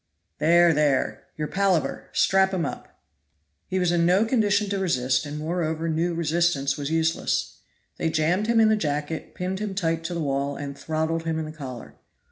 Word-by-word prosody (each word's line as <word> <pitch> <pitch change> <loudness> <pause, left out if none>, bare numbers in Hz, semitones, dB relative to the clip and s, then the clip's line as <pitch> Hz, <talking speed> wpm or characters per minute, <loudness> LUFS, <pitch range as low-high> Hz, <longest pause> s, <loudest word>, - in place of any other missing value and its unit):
"There! 170 +2 +5
there! 145 -3 +1
your 150 -1 -2
palaver! 190 -1 0
Strap 190 0 +3
him 175 - 0
up." - - -8 0.7
He 190 - -2
was 180 -2 +2
in 170 -1 +2
no 185 +5 +4
condition 210 -3 +2
to 200 - 0
resist, 130 -6 +1
and 145 +1 -5
moreover 160 0 -2
knew 165 +2 0
resistance 165 -4 +1
was 145 -1 -4
useless. 160 0 0 0.4
They 165 - 0
jammed 165 +6 +1
him 230 -1 +3
in 220 -1 +5
the 220 - +4
jacket, 150 -4 -3
pinned 185 +1 -3
him 205 -2 -4
tight 165 -3 -1
to 175 +1 -3
the - - -2
wall, 140 -1 -1
and 140 -1 -6
throttled 160 +2 -2
him 160 -1 -1
in 160 - -2
the 155 - -7
collar. 130 -6 -8
165 Hz, 185 wpm, -25 LUFS, 150-185 Hz, 0.7 s, There